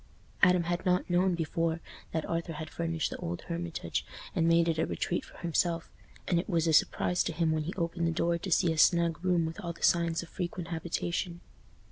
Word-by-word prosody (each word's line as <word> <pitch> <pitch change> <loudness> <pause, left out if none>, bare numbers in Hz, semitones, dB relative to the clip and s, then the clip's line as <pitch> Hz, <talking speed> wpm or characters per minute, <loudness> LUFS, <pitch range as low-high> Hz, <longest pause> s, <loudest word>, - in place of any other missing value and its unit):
Adam 180 -2 +5
had 175 +1 -2
not 180 0 +2
known 180 +1 +3
before 165 0 -1 0.3
that 160 - -1
Arthur 165 0 -2
had 155 +1 -6
furnished 165 -2 -1
the - - -4
old 85 +1 -4
Hermitage 170 - -3 0.3
and 165 - +2
made 165 0 +4
it 165 -1 +1
a - - +3
retreat 175 - -1
for - - -15
himself, 170 0 0 0.4
and 175 - +3
it 175 - -4
was 170 -3 +2
a 160 - +2
surprise 175 +3 +3
to - - -2
him 165 0 +1
when 155 -1 0
he 175 - -3
opened 170 -1 -1
the - - +1
door 170 +1 +1
to 190 - -5
see 165 0 +4
a 160 - -3
snug 170 0 +4
room 180 -3 +2
with 160 +5 -5
all 170 -1 -3
the - - -12
signs 170 -1 +3
of 170 - -12
frequent 175 -1 -4
habitation. 170 +1 -2
170 Hz, 215 wpm, -30 LUFS, 165-175 Hz, 0.4 s, Adam